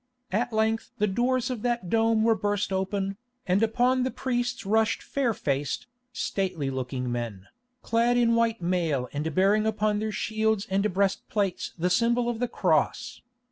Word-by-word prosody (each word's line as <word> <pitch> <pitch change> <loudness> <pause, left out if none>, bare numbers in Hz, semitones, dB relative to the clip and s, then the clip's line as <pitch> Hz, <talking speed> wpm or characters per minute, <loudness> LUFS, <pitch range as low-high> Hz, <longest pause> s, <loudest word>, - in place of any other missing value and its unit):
At 235 +5 0
length 220 0 0
the 210 - +2
doors 245 +5 0
of 240 -4 -4
that 240 -5 -1
dome 225 +2 +2
were 225 0 +5
burst 205 -2 -1
open, 195 +1 -1 0.3
and 185 +3 +2
upon 245 +3 +2
the 255 - +1
priests 245 -4 -2
rushed 220 +2 +1
fair 270 -4 0
faced, 140 -8 -2 0.3
stately 185 - -2
looking 125 -1 -3
men, 115 -6 -4 0.4
clad 235 +1 +2
in 235 -1 +4
white 230 -3 +1
mail 165 -8 0
and 150 +2 -3
bearing 205 +3 +3
upon 210 -1 +1
their 215 0 -2
shields 220 0 0
and 200 +2 +1
breastplates 195 0 -1
the 180 +2 0
symbol 235 +4 +2
of 235 -2 -3
the 245 - 0
Cross. 175 -9 0
210 Hz, 160 wpm, -27 LUFS, 185-230 Hz, 0.4 s, were